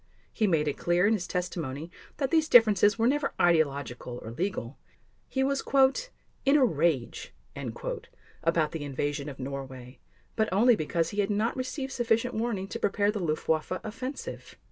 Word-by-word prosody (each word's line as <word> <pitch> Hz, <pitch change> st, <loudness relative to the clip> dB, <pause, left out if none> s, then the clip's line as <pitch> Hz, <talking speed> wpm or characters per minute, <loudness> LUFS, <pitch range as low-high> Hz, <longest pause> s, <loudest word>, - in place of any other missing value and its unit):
He 215 Hz, -, +1 dB
made 155 Hz, -5 st, +2 dB
it 145 Hz, -, -2 dB
clear 175 Hz, +2 st, +2 dB
in 215 Hz, -, +4 dB
his 185 Hz, -5 st, -2 dB
testimony 165 Hz, -4 st, -4 dB, 0.3 s
that 270 Hz, -2 st, -1 dB
these 320 Hz, -1 st, +3 dB
differences 210 Hz, -3 st, +6 dB
were 225 Hz, -, +2 dB
never 285 Hz, +3 st, +1 dB
ideological 140 Hz, -7 st, +1 dB
or 110 Hz, -, -7 dB
legal. 145 Hz, -, -3 dB, 0.5 s
He 265 Hz, -, 0 dB
was 275 Hz, 0 st, +1 dB, 0.8 s
"in 275 Hz, +2 st, +5 dB
a 270 Hz, -, +5 dB
rage" 150 Hz, -, -1 dB, 1.1 s
about 165 Hz, -2 st, +2 dB
the 160 Hz, -3 st, -5 dB
invasion 145 Hz, +1 st, -3 dB
of 140 Hz, -, -9 dB
Norway, 130 Hz, -1 st, -7 dB, 0.4 s
but 220 Hz, -1 st, +1 dB
only 230 Hz, +5 st, +5 dB
because 165 Hz, -1 st, -1 dB
he 205 Hz, -, -4 dB
had 200 Hz, 0 st, +1 dB
not 215 Hz, +3 st, 0 dB
received 265 Hz, +1 st, -4 dB
sufficient 240 Hz, 0 st, +1 dB
warning 220 Hz, -4 st, -2 dB
to -, -, -5 dB
prepare 205 Hz, 0 st, +1 dB
the 210 Hz, -, -4 dB
Luftwaffe 155 Hz, -1 st, -1 dB
offensive. 255 Hz, +6 st, -6 dB
185 Hz, 160 wpm, -28 LUFS, 150-230 Hz, 1.1 s, differences